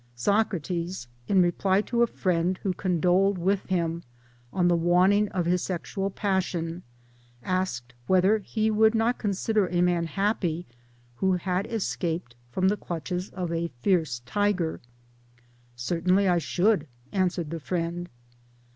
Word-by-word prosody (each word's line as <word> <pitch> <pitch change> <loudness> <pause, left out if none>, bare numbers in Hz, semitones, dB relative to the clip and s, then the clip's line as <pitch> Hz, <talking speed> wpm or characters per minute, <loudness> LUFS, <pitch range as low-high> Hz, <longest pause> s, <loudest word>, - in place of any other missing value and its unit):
Socrates, 180 - -1 0.2
in 190 -2 +4
reply 190 +3 +2
to 235 +2 -1
a 235 - +5
friend 180 -3 0
who 190 - 0
condoled 185 +2 +2
with 190 +3 0
him 170 -3 0 0.5
on 180 +1 +2
the 175 - +4
waningi 180 +5 +3
of 180 -3 -1
his 180 +1 +2
sexual 195 +2 -3
passion, 180 -4 -1 0.6
asked 185 -10 -2
whether 190 +4 +4
he 220 +1 -1
would 220 +1 +4
not 225 +2 +1
consider 205 0 +1
a 175 0 -1
man 175 -2 +1
happy 175 -1 -1 0.5
who 190 +5 +2
had 180 +1 -1
escaped 170 - -2
from 185 +9 +1
the 205 +2 +2
clutches 180 +2 -4
of 180 -3 -4
a 170 0 -1 0.2
fierce 160 -11 +1
tiger. 195 0 0 0.5
" 120 0 -32 0.2
Certainly 180 +10 +1
I 175 -1 +3
should," 180 0 +1 0.2
answered 180 -5 0
the 165 - -3
friend. 175 +2 -3
180 Hz, 140 wpm, -27 LUFS, 170-195 Hz, 0.6 s, a